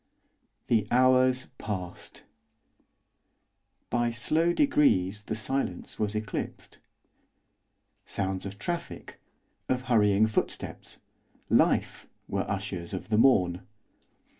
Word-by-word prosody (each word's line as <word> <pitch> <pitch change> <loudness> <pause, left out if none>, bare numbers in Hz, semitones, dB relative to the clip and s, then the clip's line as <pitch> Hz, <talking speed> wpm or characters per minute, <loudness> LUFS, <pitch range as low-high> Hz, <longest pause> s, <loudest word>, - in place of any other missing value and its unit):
The 110 -3 +2
hours 130 0 +4
passed. 90 -4 -6 1.7
By 120 0 +1
slow 155 +9 +1
degrees, 105 - +2
the 110 - -3
silence 110 -4 -3
was 105 -1 -1
eclipsed. 105 -1 -5 1.2
Sounds 95 0 -3
of 100 +1 -9
traffic, 170 +11 -5 0.5
of 130 0 0
hurrying 105 -4 +4
footsteps, 110 - -3 0.5
life! - - +2 0.2
were - - -2
ushers 95 -2 -4
of 95 - -7
the 110 -1 +3
morn. 90 -8 +4
110 Hz, 90 wpm, -28 LUFS, 100-130 Hz, 1.7 s, hours